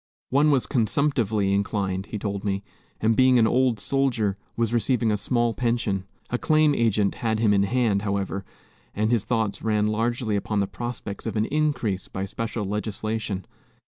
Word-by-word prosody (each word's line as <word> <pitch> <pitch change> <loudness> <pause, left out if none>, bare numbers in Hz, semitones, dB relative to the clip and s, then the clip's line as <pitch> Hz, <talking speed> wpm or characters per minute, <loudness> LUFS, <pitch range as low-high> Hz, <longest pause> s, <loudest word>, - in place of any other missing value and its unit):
One 145 +3 +4
was 135 -4 +3
consumptively 115 -5 +1
inclined, 100 -1 -1
he 110 - -4
told 100 -1 -3
me, 100 -1 -1 0.4
and 110 +1 +3
being 130 0 +5
an 115 - +5
old 125 -1 +2
soldier, 120 -6 +1 0.2
was 115 -1 0
receiving 120 0 +2
a - - +2
small 120 +3 0
pension. 105 -4 -1 0.2
A 125 - 0
claim 155 -1 +3
agent 110 -5 +2
had 110 -2 +1
him 110 -2 +3
in 100 - +4
hand, 105 -1 +1
however, 100 -1 -2 0.5
and 110 +2 +1
his 115 -4 +1
thoughts 110 -4 -1
ran 105 -1 +1
largely 115 +1 0
upon 100 +1 -1
the 100 - +2
prospects 120 -1 -6
of 110 - -3
an 110 0 +2
increase 140 -10 -1
by 95 +1 -4
special 115 +1 -4
legislation. 105 -1 -3
110 Hz, 170 wpm, -25 LUFS, 100-120 Hz, 0.5 s, being